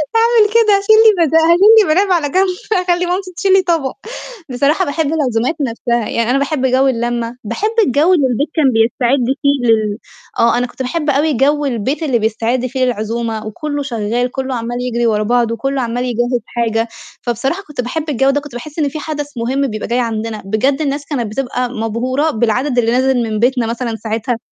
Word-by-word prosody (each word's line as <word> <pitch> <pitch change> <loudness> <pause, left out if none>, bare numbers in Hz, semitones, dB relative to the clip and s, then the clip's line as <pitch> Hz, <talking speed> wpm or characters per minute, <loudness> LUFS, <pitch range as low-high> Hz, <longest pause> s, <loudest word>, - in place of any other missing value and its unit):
هاعمل 455 -2 +4
كده 435 -3 +5
هاشيل 400 +2 +4
لي 390 -6 +5
بد 310 - -1
هاشيل 330 +2 +4 0.2
لي 380 -8 +3
مناب 385 +3 +2
على 325 -5 +1
جنب 380 +6 +2 0.3
هاخلّي 360 -2 +1
مامتي 365 +1 -3
تشيل 385 -1 +2
لي 385 - +6
طبق، 330 -7 -1 0.6
بصراحة 285 +9 +1
باحب 315 +2 -1
العزومات 255 -2 0
نفْسها 235 -2 -1
يعني 230 0 -1
أنا 265 - +2
باحب 280 -1 -1
جو 260 +1 +3
اللمة 240 -1 -2
باحب 235 - -2 0.2
الجو 300 +8 +3
اللي 290 -7 +3
البيت 255 +4 -1
كان 315 -3 +2
بيستعد 240 +3 +2 0.2
فيه 280 -3 +1
لل 215 -2 +2 0.4
آه، 230 0 +3
أنا 245 0 0
كنت 255 - -9
باحب 300 +4 -2
أوي 290 +2 +2
جو 290 +4 +1
البيت 265 +5 -2
اللي 260 -6 +1
بيستعد 225 +3 -1
فيه 260 +1 -1
للعزومة 225 -1 -3
وكلّه 290 +6 -4
شغال 240 -1 -2
كلّه 265 -1 -3
عمّال 240 +1 -4
يجري 240 -1 -1
ورا 215 -1 +1
بعضه 235 +1 +1
كلّه 270 +3 -2
عمال 240 +1 -2
يجهِّز 240 0 -1
حاجة، 225 -1 -1 0.3
فبصراحة 270 - -2
كنت 295 -4 -4
باحب 305 +6 -4
الجو 270 -1 +2
ده 290 +1 +1
كنت 290 -3 -12
باحس 295 +6 -7
إن 290 -2 +1
في 310 - -6
حدث 295 -3 -5
مهم 265 +4 0
بيبقى 215 -3 -5
جاي 240 +1 0
عندنا، 225 -2 -3
بجد 260 +8 0
الناس 285 0 -2
كانت 240 -8 -3
بتبقى 250 0 -2
مبهورة 250 +6 -1
بالعدد 245 +4 0
اللي 230 -1 +1
نازل 255 0 +2
من 215 -1 -2
بيتنا 245 0 +1
مثلًا 230 0 -3
ساعتها 225 +2 -3
255 Hz, 195 wpm, -16 LUFS, 235-295 Hz, 0.6 s, لي